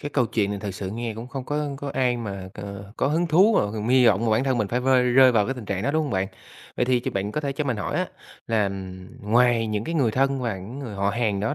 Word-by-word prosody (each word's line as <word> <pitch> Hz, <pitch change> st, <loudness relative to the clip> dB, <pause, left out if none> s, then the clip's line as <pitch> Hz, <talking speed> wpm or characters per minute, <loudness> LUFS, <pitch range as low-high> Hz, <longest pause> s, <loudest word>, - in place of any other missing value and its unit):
cái 145 Hz, -, -5 dB
câu 125 Hz, -5 st, +2 dB
chuyện 105 Hz, -3 st, 0 dB
này 100 Hz, -, -3 dB
thật 100 Hz, -, -4 dB
sự 95 Hz, -1 st, -5 dB
nghe 115 Hz, 0 st, -4 dB
cũng 115 Hz, +3 st, -8 dB
không 130 Hz, 0 st, -6 dB
có 150 Hz, +1 st, -2 dB
có 145 Hz, -1 st, -5 dB
ai 125 Hz, -2 st, +2 dB
mà 100 Hz, -5 st, -6 dB
c -, -, -17 dB, 0.4 s
có -, -, +1 dB
hứng 165 Hz, +4 st, +1 dB
thú 185 Hz, +8 st, +5 dB
mà -, -, +5 dB
còn 110 Hz, +1 st, -3 dB
hy 130 Hz, -1 st, +5 dB
vọng 110 Hz, +1 st, +3 dB
mà 115 Hz, -, +1 dB
bản 110 Hz, +4 st, +2 dB
thân 130 Hz, -3 st, +1 dB
mình 105 Hz, -3 st, 0 dB
phải 125 Hz, -, 0 dB
vơi 130 Hz, 0 st, +4 dB
rơi 125 Hz, +1 st, +6 dB
vào 105 Hz, -3 st, +3 dB
cái 135 Hz, -, -2 dB
tình 120 Hz, -4 st, -8 dB
trạng 100 Hz, 0 st, -3 dB
đó, 140 Hz, -, +1 dB
đúng 155 Hz, +1 st, +1 dB
hông 145 Hz, -, -3 dB
bạn? 95 Hz, 0 st, 0 dB, 0.5 s
Vậy 125 Hz, -, +2 dB
thì 125 Hz, -1 st, +2 dB
ch -, -, -4 dB
bạn 100 Hz, +2 st, -2 dB
có 150 Hz, -, -1 dB
thể 140 Hz, -2 st, -2 dB
cho 150 Hz, +2 st, -2 dB
mình 125 Hz, -5 st, -1 dB
hỏi -, -, -3 dB
á, -, -, 0 dB, 0.4 s
là, 110 Hz, -2 st, +2 dB
ừm, 95 Hz, -1 st, -6 dB, 0.2 s
ngoài 120 Hz, -1 st, +4 dB
những 105 Hz, 0 st, -2 dB
cái 165 Hz, -, -3 dB
người 135 Hz, -8 st, +2 dB
thân 135 Hz, +2 st, +1 dB
và 115 Hz, -5 st, -2 dB
những 110 Hz, +9 st, -8 dB
người 120 Hz, -7 st, -6 dB
họ 100 Hz, 0 st, 0 dB
hàng 105 Hz, -4 st, 0 dB
đó 110 Hz, +7 st, -1 dB
120 Hz, 305 wpm, -24 LUFS, 105-135 Hz, 0.5 s, rơi